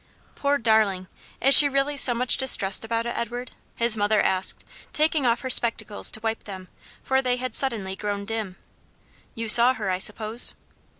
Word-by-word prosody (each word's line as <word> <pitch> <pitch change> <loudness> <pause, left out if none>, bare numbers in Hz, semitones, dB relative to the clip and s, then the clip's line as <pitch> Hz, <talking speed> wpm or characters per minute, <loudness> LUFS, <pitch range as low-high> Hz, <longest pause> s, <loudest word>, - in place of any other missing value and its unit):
"Poor 285 0 -2
darling! 220 -6 0 0.4
is 275 - +4
she 290 - +9
really 275 +1 -2
so 255 -3 +2
much 250 +1 +1
distressed 200 -8 +2
about 230 +1 -4
it, 240 - -5
Edward?" 240 +1 -6 0.2
his 235 -1 0
mother 210 0 0
asked, 185 0 -1 0.3
taking 305 -3 -1
off 235 0 -1
her 260 - -6
spectacles 230 -4 +2
to - - -3
wipe 225 0 -5
them, 190 -2 -11 0.3
for 265 0 -1
they 250 -1 -2
had 255 +1 -6
suddenly 215 -8 -2
grown 200 0 -6
dim. 215 -3 -6 0.8
"You 230 0 -6
saw 240 +4 +6
her, 205 -5 -5
I 185 - -3
suppose?" 215 +3 0
230 Hz, 175 wpm, -22 LUFS, 210-255 Hz, 0.8 s, she